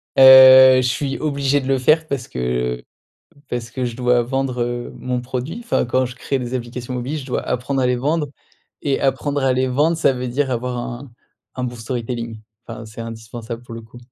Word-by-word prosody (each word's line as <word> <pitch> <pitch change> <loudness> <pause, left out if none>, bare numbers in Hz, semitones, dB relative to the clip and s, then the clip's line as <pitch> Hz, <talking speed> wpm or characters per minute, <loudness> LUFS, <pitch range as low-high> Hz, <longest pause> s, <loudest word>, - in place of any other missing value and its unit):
Heu, 130 0 +9
je 125 - 0
suis 135 +2 -2
obligé 140 -2 0
de 130 - -6
le 135 0 +2
faire 155 +5 +3
parce 135 -5 -4
que 60 0 -3 0.7
parce 120 -1 -4
que 125 +2 -3
je 120 -2 -4
dois 125 -1 +2
vendre, 125 0 -2
heu, 120 0 -4
mon 125 0 -3
produit 130 - -5
enfin 230 - 0
quand 130 +1 0
je 125 - -9
crée 135 +2 -2
des 125 0 -5
applications 125 0 -5
mobiles, 130 +5 -3
je 130 - -8
dois 125 - -2
apprendre 130 +2 -2
à - - +2
les 125 0 +1
vendre 150 +4 -1 0.5
et 140 -2 0
apprendre 140 +1 -1
à 130 - +3
les 130 +1 0
vendre, 150 +6 +1
ça 150 -4 +3
veut 125 0 -4
dire 135 +2 -1
avoir 125 0 -3
un 120 +2 -7 0.5
un 125 - -2
bon 120 -1 -5
storytelling 115 -1 -5 0.3
enfin, 115 - -8
c'est 110 +1 -10
indispensable, 115 +1 -8
pour 120 -1 -10
le 115 - -8
coup. 115 +2 -15
125 Hz, 210 wpm, -20 LUFS, 120-135 Hz, 0.7 s, Heu